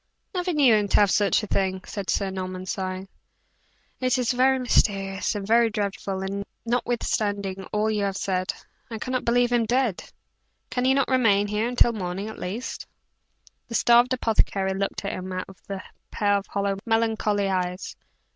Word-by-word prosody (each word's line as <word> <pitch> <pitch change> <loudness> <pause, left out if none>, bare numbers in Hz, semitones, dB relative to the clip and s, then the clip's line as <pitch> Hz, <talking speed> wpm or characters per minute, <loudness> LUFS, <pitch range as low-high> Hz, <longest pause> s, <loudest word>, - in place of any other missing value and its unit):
"Never 360 -1 -1
knew 285 -7 +5
him 210 -1 +3
to - - -1
have 200 -2 +4
such 205 +1 +3
a - - -1
thing," 190 -2 -1
said 200 -3 -6
Sir 195 -2 0
Norman, 185 -1 -5
sighing. 185 0 -4 0.9
"It 255 0 +2
is 250 -1 +1
very 260 +1 +3
mysterious 195 -6 +1
and 200 -1 -3
very 230 +2 +4
dreadful, 200 -2 -3
and 200 +1 -3 0.2
notwithstanding 205 -5 -1
all 210 +3 0
you 210 -1 0
have 195 -1 -2
said, 185 -1 -1 0.4
I 225 - -5
cannot 255 +3 -2
believe 245 +1 +3
him 235 -2 +2
dead. 245 -4 +1 0.7
Can 250 0 0
he 265 +1 +4
not 275 - +2
remain 225 -6 +3
here 210 +2 -1
until 245 -1 +3
morning, 190 0 -4
at 220 - -9
least?" 205 +8 -5 0.8
The 230 - -5
starved 240 +2 +5
apothecary 210 -5 +1
looked 195 +1 -3
at 200 - -1
him 185 0 -5
out 185 0 -3
of 195 - -14
a 195 -1 -4 0.3
pair 205 -2 +1
of 200 0 -2
hollow, 200 -1 -1
melancholy 220 -3 +1
eyes. 180 -1 -2
205 Hz, 175 wpm, -25 LUFS, 195-235 Hz, 0.9 s, knew